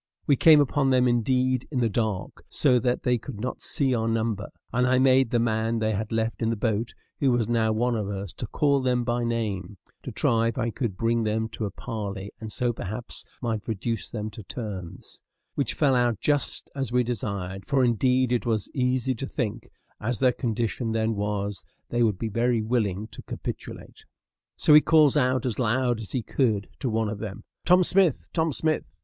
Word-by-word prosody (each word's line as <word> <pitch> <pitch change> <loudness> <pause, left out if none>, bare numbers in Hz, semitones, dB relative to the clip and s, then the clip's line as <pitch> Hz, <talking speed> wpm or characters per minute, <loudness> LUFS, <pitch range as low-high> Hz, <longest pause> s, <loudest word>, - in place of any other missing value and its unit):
We 140 - +4
came 155 +2 +7
upon 145 -1 +2
them, 125 -1 +4
indeed, 125 +1 +1
in 135 - -2
the 120 - +3
dark, 110 -3 -2
so 125 -4 +3
that 125 0 0
they 125 -1 +2
could 115 -3 -8
not 125 +3 -4
see 135 -3 +1
our 115 -2 0
number; 110 -2 -1 0.2
and 125 +1 +2
I 130 0 +3
made 130 -1 +4
the 120 - +1
man 115 0 0
they 110 -1 0
had 110 +1 -3
left 115 +1 -1
in 115 - +1
the 115 - 0
boat, 110 0 -1 0.2
who 140 - +3
was 120 -3 +1
now 115 -2 +2
one 120 +2 +1
of 105 -3 -2
us, 100 -2 -5
to - - -6
call 140 -2 +2
them 125 -1 +1
by 120 0 -1
name, 105 -5 -2 0.2
to - - -6
try 115 0 +2
if 115 - -3
I 120 -2 0
could 110 -6 -3
bring 115 +2 +1
them 110 +1 -1
to 110 - -4
a - - -2
parley, 100 -3 -5
and 110 -1 -6
so 120 +2 0
perhaps 110 +4 -5 0.2
might 110 -3 -2
reduce 110 0 -3
them 110 -1 -4
to 110 - -9
terms; 95 -2 -7 0.3
which 140 - -1
fell 145 -3 +3
out 120 -4 +2
just 145 -2 0
as 135 -4 -3
we 125 0 +3
desired, 100 -5 -4
for 135 -2 +3
indeed 125 +2 +2
it 120 0 0
was 110 -3 -1
easy 130 0 +1
to 130 +3 -5
think, 115 -3 -4 0.3
as 120 +2 -2
their 130 -2 +3
condition 115 -1 -2
then 110 0 +1
was, 105 -1 -2 0.3
they 120 - 0
would 110 -5 +2
be 115 - -3
very 115 +1 +1
willing 110 -4 0
to - - -10
capitulate. - - -7 0.5
So 150 - +4
he 150 - +9
calls 155 -4 +5
out 130 -3 +2
as 125 -2 -2
loud 120 0 +1
as 110 - -7
he 125 -4 -1
could 110 -7 0
to 130 - -1
one 110 0 0
of 105 -1 -4
them, 105 -3 -6 0.2
"Tom 180 +1 +6
Smith! 180 -5 +3
Tom 160 -1 +1
Smith!" 155 +2 -1
115 Hz, 205 wpm, -26 LUFS, 110-130 Hz, 0.5 s, he